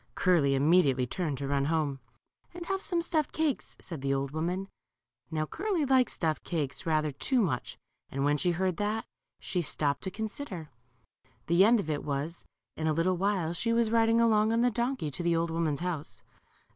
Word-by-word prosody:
Curly 160 -7 +3
immediately 140 -3 +4
turned 150 +2 -2
to 140 +1 -4
run 140 0 +1
home. 150 -3 0 0.6
And 350 -1 -6
have 385 +2 -1
some 345 -4 -1
stuffed 310 -3 0
cakes," 310 -5 -1
said 165 -6 -8
the 135 0 +1
old 135 0 -2
woman. 175 +5 -2 0.6
Now 155 -1 -1
Curly 375 - -1
liked 260 -2 +4
stuffed 160 -2 -1
cakes 155 0 -3
rather 155 -1 +1
too 250 - 0
much, 155 - -1 0.3
and 135 +1 -1
when 145 0 +3
she 180 +4 +1
heard 185 0 0
that, 210 +2 -1 0.3
she 180 - -1
stopped 145 -3 -1
to 190 - -2
consider. 205 - -6 0.7
The 170 +5 +5
end 230 +3 +5
of 200 - -3
it 150 -2 -2
was, 150 +4 -4 0.3
in 160 - -2
a 155 - +2
little 175 +3 +1
while 185 -3 0
she 230 +7 -1
was 230 -1 +2
riding 230 0 +4
along 220 -2 +4
on 230 +1 +2
the 245 0 +3
donkey 240 - -1
to 160 - -5
the 170 -1 +2
old 165 0 0
woman's 160 -2 -1
house. 175 -5 -4
170 Hz, 190 wpm, -29 LUFS, 150-225 Hz, 0.7 s, The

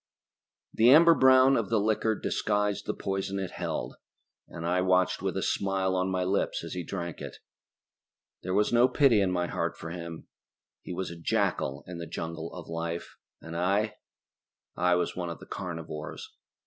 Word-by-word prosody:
The 115 +2 +5
amber 165 +5 +8
brown 130 -1 +6
of 115 -5 0
the 115 -1 +2
liquor 110 +1 +1
disguised 105 -1 -1
the - - -1
poison 95 0 -3
it 95 -2 -3
held, - - -4 0.5
and 85 -1 -7
I 90 +2 +2
watched 95 0 +2
with - - -2
a - - -1
smile 95 -1 0
on 95 0 0
my 95 -1 0
lips 95 +2 0
as - - -6
he 90 -1 -3
drank 85 -2 -5
it. - - -7 1.0
There 90 +1 -2
was 105 +3 +2
no 120 +1 +6
pity 130 -7 +4
in 95 -2 +1
my 90 -1 0
heart - - -2
for 80 - -7
him. 85 -2 -7 0.6
He - - -8
was 90 +1 -3
a - - -7
jackal 70 -3 0
in 90 -1 -7
the 85 - -6
jungle 80 0 -5
of 90 -3 -9
life, 85 +1 -4 0.3
and 80 0 -7
I... 100 +5 0 0.8
I 90 0 +3
was 90 - -1
one 90 -1 -3
of 85 - -6
the - - -13
carnivores. 80 -5 -6
95 Hz, 180 wpm, -28 LUFS, 85-105 Hz, 1.0 s, amber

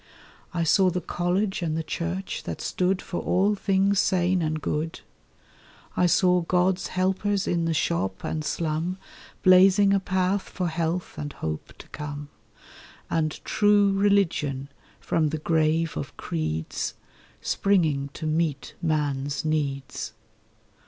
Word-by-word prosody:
I 170 -2 -1
saw 185 +3 +4
the 180 0 -1
college 180 +4 -1
and 160 -2 -1
the 160 - -1
church 170 +4 -3
that - - -4
stood 185 +1 0
For 175 - -4
all 195 +3 +2
things 195 0 +2
sane 180 0 +2
and 155 -1 -1
good. 155 +2 -3 0.9
I 180 - +3
saw 180 0 +4
God's 180 +2 +1
helpers 190 +2 0
in 170 -1 +1
the 165 - +1
shop 95 - -1
and 155 -1 -2
slum 165 +3 -1 0.5
Blazing 190 +2 +6
a 200 - +4
path 190 +1 0
for 180 -2 -3
health 165 +2 -2
and 145 -1 -5
hope 80 -1 -5
to - - -12
come, 145 -1 -6 0.8
And 155 -2 0
True 205 -1 +4
Religion, 175 -9 +1 0.3
from 160 -1 +1
the 155 - -2
grave 160 +1 +1
of 75 - -6
creeds, 80 0 -3 0.4
Springing 155 -8 +1
to 160 - -5
meet 155 -2 -1
man's 145 -3 -1
needs. 140 -6 -2
170 Hz, 130 wpm, -26 LUFS, 155-190 Hz, 0.9 s, Blazing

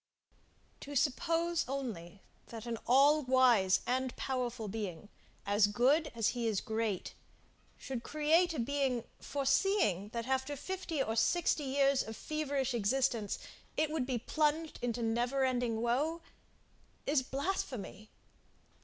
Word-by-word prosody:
To 285 +1 -8
suppose 330 +5 +1
only, 210 -10 -5 0.2
that 225 -1 -8
an 230 -2 -3
all 280 +5 +6
wise 250 -8 +4
and 260 0 -1
powerful 250 -4 -3
Being, 205 -3 -5 0.4
as 205 +1 +4
good 260 +9 +2
as 225 -2 +2
he 240 -2 -2
is 215 -3 +1
great, 220 -4 -2 0.6
should 260 -3 -5
create 315 +6 +2
a - - -3
being, 260 -1 0 0.2
foreseeing, 275 - +1
that 230 0 -4
after 265 +2 -1
fifty 340 -4 -3
or 225 - -2
sixty 310 +4 +2
years 275 0 +3
of 220 0 -6
feverish 285 -4 -2
existence, 230 -1 0 0.4
it 310 0 +1
would 295 -5 -1
be 255 -2 0
plunged 310 +5 0
into 240 -1 -2
never 245 +4 +1
ending 245 -3 0
woe 295 +8 0 0.8
is 285 -1 +2
blasphemy. 260 - -4
255 Hz, 125 wpm, -33 LUFS, 225-285 Hz, 0.8 s, all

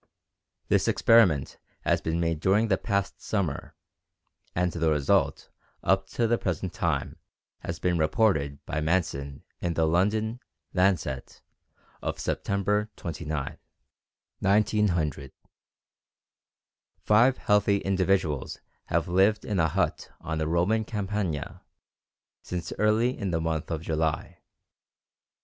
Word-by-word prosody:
This - - +2
experiment 100 - +4 0.2
has - - +2
been 80 +1 -1
made 85 -2 0
during 100 +6 +2
the 95 - +3
past 100 -3 -2
summer, 95 -9 -2 0.8
and 90 0 +1
the 80 -1 0
result 75 -3 +1 0.3
up 95 +1 +2
to 115 - -1
the 115 +1 +2
present 90 0 -2
time - - -1 0.4
has 85 - -5
been 90 +1 0
reported 75 -5 +1
by 75 - -2
Manson 75 -4 -1 0.2
in 85 -1 -2
the 80 - +2
London 105 +8 +1 0.3
Lancet 90 -8 0 0.6
of - - -3
September 105 +2 0
29, 80 -4 -5 0.8
1900. 95 -9 +1 1.7
Five 120 +5 +4
healthy 105 -1 +3
individuals 95 -6 0 0.3
have - - 0
lived 95 +5 +3
in 100 -4 -1
a 80 - +4
hut - - -1
on 80 -1 -4
the 80 - -1
Roman 90 +7 +2
Campagna 100 -8 -3 0.8
since 90 -1 -5
early 110 +4 +3
in 100 - -3
the 85 -2 0
month 80 -1 -2
of 80 -2 -3
July. 80 -1 -2
90 Hz, 115 wpm, -27 LUFS, 80-105 Hz, 1.7 s, experiment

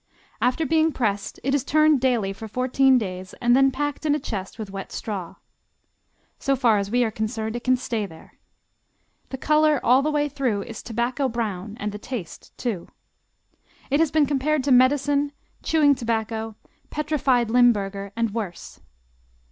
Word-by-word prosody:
After 255 +6 +1
being 320 +2 +3
pressed 205 -7 -2
it 270 +2 0
is 285 -3 +1
turned 305 -2 +3
daily 235 -7 +1
for 220 +3 -8
fourteen 255 +3 +3
days 185 -4 -5
and 240 0 +3
then 270 +1 +5
packed 290 +2 -3
in 295 -1 +2
a - - -1
chest 200 -8 -5
with 215 -3 -6
wet 195 0 -7
straw. 195 -6 -5 1.0
So 275 - +1
far 235 -5 +3
as 200 0 -3
we 245 +3 +2
are 225 - -1
concerned 220 +1 -3
it 240 - -5
can 255 0 +3
stay 225 -4 -3
there. 160 -3 -15 1.0
The 265 - -5
color 305 +1 +3
all 255 +3 +5
the 300 - 0
way 295 -1 +1
through 255 -8 -1
is 225 - -8
tobacco 240 +4 -1
brown 215 -3 -4
and 210 0 -3
the 210 - -7
taste, 225 -7 -8
too. 220 -9 -3 1.0
It 285 - +3
has 325 -1 +3
been 310 0 +3
compared 285 +1 0
to 275 - 0
medicine, 280 +3 +3 0.3
chewing 300 -3 +4
tobacco, 225 -3 -3 0.3
petrified 275 -6 +1
Limburger, 200 -5 +2
and 230 -2 -1
worse. 205 -6 -6
245 Hz, 165 wpm, -24 LUFS, 215-280 Hz, 1.0 s, then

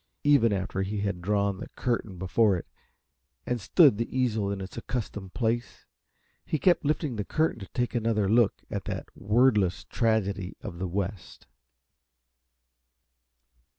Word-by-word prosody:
Even 140 -6 +5
after 95 -1 -2
he 100 +1 -2
had 100 -3 -2
drawn 100 0 0
the - - -7
curtain 115 -6 -2
before 95 +2 +2
it 85 - -7 0.8
and 125 -2 -2
stood 140 - +5
the 115 +2 -2
easel 110 -6 +1
in 100 - -3
its 95 0 -7
accustomed 105 -5 -5
place, 120 0 -2 0.6
he 155 - -1
kept 175 +3 +3
lifting 150 -4 -1
the 105 - -1
curtain 155 +2 0
to 95 - -8
take 120 -1 -2
another 115 -4 +1
look 115 +1 +3
at - - -3
that - - -5
wordless 105 -3 +2
tragedy 100 -5 -1
of 90 -6 -7
the 95 - -2
West. 95 +2 -4
105 Hz, 145 wpm, -28 LUFS, 95-120 Hz, 0.8 s, Even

